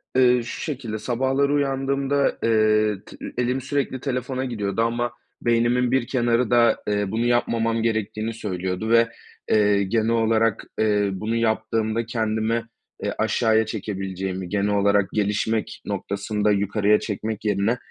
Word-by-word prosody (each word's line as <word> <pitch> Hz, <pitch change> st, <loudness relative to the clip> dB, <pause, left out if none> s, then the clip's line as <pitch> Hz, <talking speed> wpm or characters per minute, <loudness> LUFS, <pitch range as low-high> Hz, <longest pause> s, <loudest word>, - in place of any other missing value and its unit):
Eee, 125 Hz, -1 st, +5 dB
şu -, -, -6 dB
şekilde, 120 Hz, -8 st, -4 dB
sabahları 135 Hz, +4 st, +1 dB
uyandığımda, 140 Hz, 0 st, 0 dB
eee, 110 Hz, -2 st, +3 dB
tı -, -, -13 dB
ü -, -, -6 dB
elim 125 Hz, +2 st, 0 dB
sürekli 135 Hz, -1 st, -2 dB
telefona 130 Hz, 0 st, -2 dB
gidiyordu 105 Hz, -3 st, -2 dB
ama 120 Hz, +1 st, 0 dB, 0.3 s
beynimin 120 Hz, +1 st, +2 dB
bir 130 Hz, -2 st, +1 dB
kenarı 120 Hz, -2 st, +1 dB
da, 120 Hz, -1 st, +4 dB
eee, 105 Hz, -2 st, 0 dB
bunu 115 Hz, +2 st, 0 dB
yapmamam 115 Hz, -1 st, +1 dB
gerektiğini 110 Hz, 0 st, -1 dB
söylüyordu 95 Hz, 0 st, -3 dB
ve, 115 Hz, 0 st, +5 dB, 0.4 s
eee, 105 Hz, -2 st, +4 dB
genel 110 Hz, +3 st, 0 dB
olarak, 115 Hz, -1 st, +2 dB, 0.2 s
eee, 105 Hz, -2 st, +2 dB
bunu 110 Hz, +4 st, -2 dB
yaptığımda 110 Hz, 0 st, 0 dB
kendimi, 115 Hz, 0 st, -1 dB, 0.4 s
eee, -, -, -2 dB
aşağıya 110 Hz, 0 st, +2 dB
çekebileceğimi, 95 Hz, -3 st, -4 dB
genel 105 Hz, 0 st, 0 dB
olarak 100 Hz, -1 st, +3 dB
gelişmek 105 Hz, +1 st, -1 dB
noktasında 105 Hz, +1 st, -1 dB
yukarıya 105 Hz, +1 st, +2 dB
çekmek 110 Hz, 0 st, -4 dB
yerine, 105 Hz, +4 st, +1 dB
110 Hz, 135 wpm, -23 LUFS, 105-120 Hz, 0.4 s, Eee